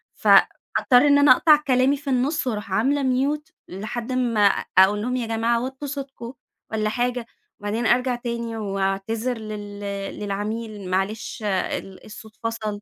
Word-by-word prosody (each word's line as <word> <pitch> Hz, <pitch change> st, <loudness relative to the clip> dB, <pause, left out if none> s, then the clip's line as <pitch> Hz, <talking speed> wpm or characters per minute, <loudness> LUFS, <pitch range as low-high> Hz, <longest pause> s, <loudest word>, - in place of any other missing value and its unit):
فاضطر 250 Hz, +2 st, +4 dB
إن 285 Hz, 0 st, +6 dB
أنا 285 Hz, -2 st, +6 dB
أقطع 305 Hz, +4 st, +7 dB
كلامي 260 Hz, +2 st, +3 dB
في 280 Hz, 0 st, -7 dB
النص 265 Hz, +3 st, 0 dB
وأروح 210 Hz, -4 st, -3 dB
عاملة 275 Hz, +8 st, +1 dB, 0.3 s
mute، 300 Hz, +1 st, -14 dB, 0.2 s
لحد 220 Hz, +6 st, -5 dB
أما 245 Hz, -4 st, 0 dB, 0.4 s
أقول 200 Hz, +2 st, +6 dB
لهم 250 Hz, +3 st, -2 dB
يا 235 Hz, -3 st, -3 dB
جماعة 230 Hz, +1 st, 0 dB
وطّوا 265 Hz, +3 st, -6 dB
صوتكم 270 Hz, -3 st, -7 dB, 0.4 s
والّا 215 Hz, -1 st, 0 dB
حاجة، 245 Hz, +1 st, -1 dB, 0.3 s
وبعدين 210 Hz, +4 st, -2 dB
أرجع 250 Hz, +1 st, +2 dB
تاني 235 Hz, -1 st, -4 dB
وأعتذر 200 Hz, +4 st, -2 dB
لل 210 Hz, -2 st, -7 dB, 0.4 s
للعميل، 210 Hz, 0 st, -4 dB
معلش 195 Hz, +4 st, -2 dB
ال 190 Hz, -1 st, -3 dB
الصوت 215 Hz, +1 st, -12 dB
فصل. 220 Hz, -2 st, -3 dB
230 Hz, 140 wpm, -23 LUFS, 210-255 Hz, 0.4 s, أقطع